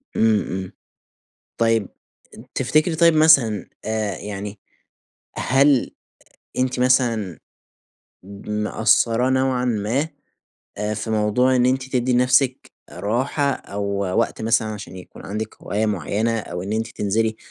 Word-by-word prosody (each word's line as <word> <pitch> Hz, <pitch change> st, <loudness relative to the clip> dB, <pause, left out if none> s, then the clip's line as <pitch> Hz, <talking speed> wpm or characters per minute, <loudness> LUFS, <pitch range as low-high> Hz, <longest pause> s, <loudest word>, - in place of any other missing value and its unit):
إمم، 110 Hz, -2 st, +3 dB
إمم. 95 Hz, 0 st, -5 dB, 0.9 s
طيَّب، 115 Hz, -3 st, +2 dB, 0.7 s
تفتكري 155 Hz, +5 st, +1 dB
طيب 170 Hz, 0 st, +5 dB
مثلًا، 135 Hz, -, +4 dB, 0.2 s
آآ 110 Hz, -3 st, -2 dB
يعني، 100 Hz, 0 st, -6 dB, 0.8 s
هل 135 Hz, 0 st, +3 dB, 0.7 s
أنتِ 130 Hz, 0 st, 0 dB
مثلًا 120 Hz, -, +1 dB, 1.1 s
مقصّرة 115 Hz, +3 st, +2 dB
نوعًا 130 Hz, -1 st, +1 dB
ما، 120 Hz, +6 st, 0 dB, 0.7 s
آآ، 105 Hz, +1 st, -2 dB
في 110 Hz, +1 st, -5 dB
موضوع 110 Hz, +4 st, +2 dB
إن 125 Hz, 0 st, +3 dB
أنتِ 130 Hz, 0 st, 0 dB
تدّي 125 Hz, 0 st, +1 dB
نفسِك 130 Hz, +1 st, +2 dB, 0.2 s
راحة 135 Hz, +6 st, -1 dB
أو 100 Hz, -5 st, -5 dB, 0.3 s
وقت 115 Hz, -, -1 dB
مثلًا 110 Hz, 0 st, +2 dB
عشان 100 Hz, -3 st, -7 dB
يكون 90 Hz, -, -12 dB
عندِك 105 Hz, +2 st, -5 dB
هواية 105 Hz, +2 st, -1 dB
معينة 105 Hz, +4 st, -1 dB
أو 90 Hz, -3 st, -6 dB
إن 100 Hz, +3 st, -3 dB
أنتِ 110 Hz, +1 st, -1 dB
تنزلي؟ 110 Hz, 0 st, -1 dB
115 Hz, 115 wpm, -22 LUFS, 105-130 Hz, 1.1 s, طيب